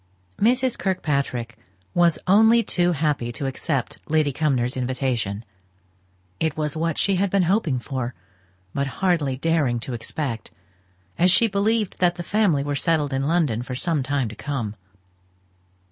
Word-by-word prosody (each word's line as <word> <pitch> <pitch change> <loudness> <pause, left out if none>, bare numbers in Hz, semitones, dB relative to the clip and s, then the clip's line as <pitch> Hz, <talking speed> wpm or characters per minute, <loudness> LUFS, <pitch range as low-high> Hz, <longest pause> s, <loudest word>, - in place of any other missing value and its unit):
Mrs. 250 +3 +2
Kirkpatrick 140 - -2 0.3
was 175 -2 +3
only 220 +5 +5
too 175 -3 +1
happy 145 -6 -1
to 135 - -5
accept 135 0 -2
Lady 155 -2 +2
Cumnor's 130 -4 0
invitation. 125 -5 -2 0.9
It 160 -2 -1
was 150 -1 -1
what 165 0 -1
she 195 -2 +2
had 200 +1 +1
been 195 0 +2
hoping 175 - +1
for, 130 -1 -4 0.6
but 140 0 -1
hardly 165 -9 +1
daring 145 -5 +1
to 125 - -5
expect, 120 0 -4 0.7
as 180 - +5
she 190 +6 +6
believed 210 0 0
that 175 -1 +3
the 175 - -5
family 185 -7 +2
were 145 0 -2
settled 150 -2 +1
in 135 +1 0
London 155 -9 +1
for 125 +1 -5
some 160 +2 +1
time 135 -1 -1
to 110 - -9
come. 120 -7 -4
150 Hz, 145 wpm, -23 LUFS, 130-180 Hz, 0.9 s, she